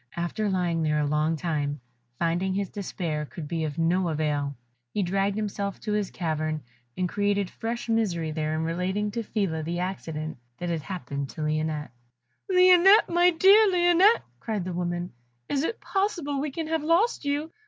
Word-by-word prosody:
After 190 +5 -1
lying 175 -3 0
there 150 -1 +1
a 150 - +1
long 150 +2 +1
time, 150 -3 -2 0.4
finding 175 +4 0
his 200 -2 -2
despair 170 -6 -3
could 150 +1 -8
be 160 0 -2
of 150 -2 -5
no 170 +2 +2
avail, 150 -2 -1 0.4
he 205 - +2
dragged 195 +2 0
himself 200 -2 -3
to 210 - -2
his 210 -2 0
cavern, 155 -2 -2 0.3
and 185 - +1
created 205 0 0
fresh 235 +1 -4
misery 190 -9 0
there 155 0 -1
in 160 - -1
relating 185 +5 -1
to 230 - -2
Phila 195 -7 -1
the 170 +3 -3
accident 160 -5 -4 0.2
that 175 - -4
had 165 -2 -1
happened 140 -6 -5
to - - -8
Lionette. 155 0 -1 0.6
"Lionette! 365 +2 +6
my 350 +1 +5
dear 390 +5 +6
Lionette!" 360 +4 +4 0.2
cried 215 -5 -3
the 185 - -4
good 175 - -4
woman, 175 0 -2 0.4
"is 280 0 0
it 455 - -2
possible 345 -9 -1
we 300 - -1
can 320 +4 -4
have 320 0 -1
lost 335 +9 +2
you? 290 +3 -1
185 Hz, 175 wpm, -26 LUFS, 160-235 Hz, 0.6 s, Lionette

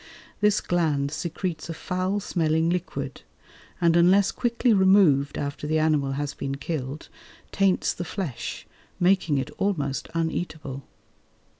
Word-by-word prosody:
This 210 0 +3
gland 150 -5 0
secretes 170 +1 -4
a 165 - -4
foul 185 +4 -1
smelling 165 -3 +1
liquid, 180 0 -4 0.6
and 170 -2 +3
unless 185 +3 +5
quickly 240 0 +1
removed 190 -8 +4
after 145 +1 -4
the 155 +1 +1
animal 150 -3 +2
has 145 +1 -3
been 135 -1 -4
killed, 140 -1 -5 0.4
taints 195 -2 +2
the 175 - -5
flesh, 170 - -5 0.3
making 175 -5 +3
it 130 - -2
almost 145 -9 -1
uneatable. 160 -4 -3
165 Hz, 125 wpm, -25 LUFS, 145-185 Hz, 0.6 s, unless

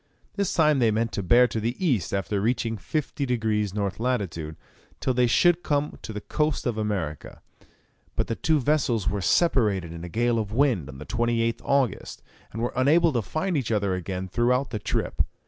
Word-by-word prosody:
This 200 -3 -1
time 155 -3 +3
they 115 -3 +4
meant 115 +2 0
to - - -3
bear 120 +7 +5
to 115 - -3
the 115 +3 -2
east 130 - 0
after 100 +1 -1
reaching 115 0 0
50 145 +6 -3
degrees 110 -5 -1
N. 100 -2 0
lat. 115 -6 -1 0.6
till 130 - 0
they 125 0 +3
should 175 +8 +4
come 145 -3 -1
to - - -7
the 105 -1 -5
coast 150 +5 -1
of 120 -3 0
America; 100 -9 -3 0.8
but - - 0
the - - -2
two 160 +4 +1
vessels 125 -7 +1
were 100 -1 0
separated 100 - +2
in 85 0 -8
a 90 - -6
gale 120 +4 +1
of 105 -2 -3
wind 115 - +1
on 65 - -9
the 75 - -9
28th 115 +1 0
August, 140 -3 -1 0.3
and 115 +2 -4
were 120 - -2
unable 155 +5 +4
to 120 - +1
find 155 - -2
each 130 -6 -1
other 100 -3 +1
again 90 +1 -4
throughout 125 +6 +1
the 110 - -3
trip. - - -2
115 Hz, 195 wpm, -25 LUFS, 100-135 Hz, 0.8 s, bear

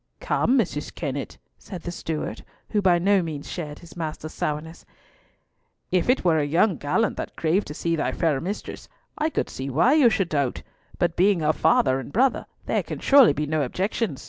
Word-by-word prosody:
"Come, 275 - +1
Mrs. 170 - -2
Kennett," 140 -3 -4 0.2
said 185 -4 -9
the 175 - -4
steward, 160 -3 -4 0.3
who 210 - +2
by 180 -3 +4
no 195 +2 +3
means 155 -4 -5
shared 150 -4 -6
his 170 -4 -14
master's 155 -2 -5
sourness, 155 +2 -4 1.1
"if 185 +4 +1
it 255 -6 +2
were 160 -3 +4
a - - +1
young 165 +5 +2
gallant 200 +10 0
that - - -5
craved 170 +5 0
to 150 - -7
see 165 +1 -1
thy 155 - -1
fair 155 -5 0
mistress, 195 +5 -6 0.3
I 310 +1 0
could - - -2
see 135 +1 -6
why 165 - +3
you 290 -6 +6
should 195 -5 0
doubt, 140 -4 -1 0.3
but 175 -1 0
being 190 -1 +3
her 155 0 +2
father 130 -2 +3
and 135 - -8
brother, 255 - +1 0.2
there - - +1
can - - -6
surely 275 - +6
be 150 +1 -2
no 155 +1 0
objection." 185 - -2
170 Hz, 195 wpm, -24 LUFS, 150-200 Hz, 1.1 s, you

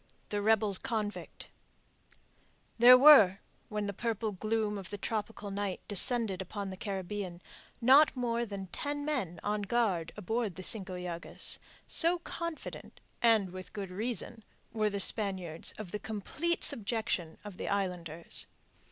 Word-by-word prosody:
THE 205 -1 -1
REBELS 210 -2 +4
CONVICT 215 -3 -4 1.3
There 250 +2 +10
were, 255 -9 +8 0.3
when 210 -1 -2
the 200 - -3
purple 225 0 -2
gloom 215 +1 -1
of 190 - -9
the 205 - -5
tropical 210 -1 -4
night 200 -1 -3
descended 205 -1 +3
upon 195 +1 -5
the - - -6
Caribbean, 190 -2 -5 0.4
not 275 +6 +6
more 235 -1 0
than 200 -4 -6
ten 290 - -4
men 250 - -2
on 210 0 -1
guard 200 -6 0
aboard 215 -1 -2
the 185 - -7
Cinco 190 -2 0
Llagas, 175 -1 -3 0.3
so 340 +2 +2
confident 335 -1 -7 0.2
and 220 -5 +3
with 185 0 -9
good 200 -3 -5
reason 225 +2 -4 0.3
were 215 -1 +1
the 200 -1 -3
Spaniards 190 -6 +2
of 210 -5 -7
the 210 - -3
complete 220 - -2
subjection 210 -7 -1
of 200 -3 -9
the - - -5
islanders. 175 -5 -3
205 Hz, 140 wpm, -31 LUFS, 190-230 Hz, 1.3 s, There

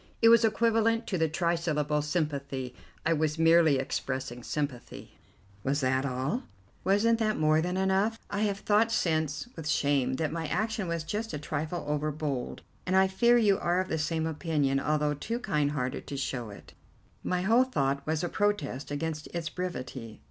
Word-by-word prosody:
It 230 - +6
was 230 0 +7
equivalent 225 +1 +2
to 185 - -2
the 160 -1 +2
trisyllable 155 -3 0
'Sympathy.' 140 -5 -2 0.3
I 165 - +3
was 155 0 0
merely 165 -3 +5
expressing 130 -2 -3
sympathy." 140 -1 -5 0.4
"Was 140 +2 0
that 130 +1 +1
all?" 135 - -2 0.4
"Wasn't 225 +4 +3
that 215 -1 +1
more 155 0 +3
than 180 +2 -2
enough? 190 +4 +1
I 200 - -3
have 205 -2 +1
thought 220 +2 +3
since, 160 - 0
with 160 -2 -5
shame, 140 -4 +2
that 155 +2 -1
my 165 -1 -3
action 215 +2 -1
was 170 -1 -2
just 210 +8 -4
a - - -2
trifle 155 +3 -4
over 150 +1 0
bold, 145 -4 -4 0.2
and 185 - +1
I 190 0 +6
fear 235 +6 +4
you 205 -4 +3
are 175 +1 +1
of 185 - -2
the 160 - -1
same 160 +1 -1
opinion, 150 -4 0
although 150 0 +1
too 225 +11 -3
kind 150 -11 0
hearted 125 -3 -3
to 140 - -5
show 125 -4 -3
it." 100 - -12 0.5
"My 180 0 -1
whole 230 +6 +5
thought 140 - -1
was 155 +1 0
a - - +1
protest 175 -10 -1
against 155 +1 -3
its 165 -2 -2
brevity." 130 - -6
160 Hz, 175 wpm, -29 LUFS, 145-190 Hz, 0.5 s, was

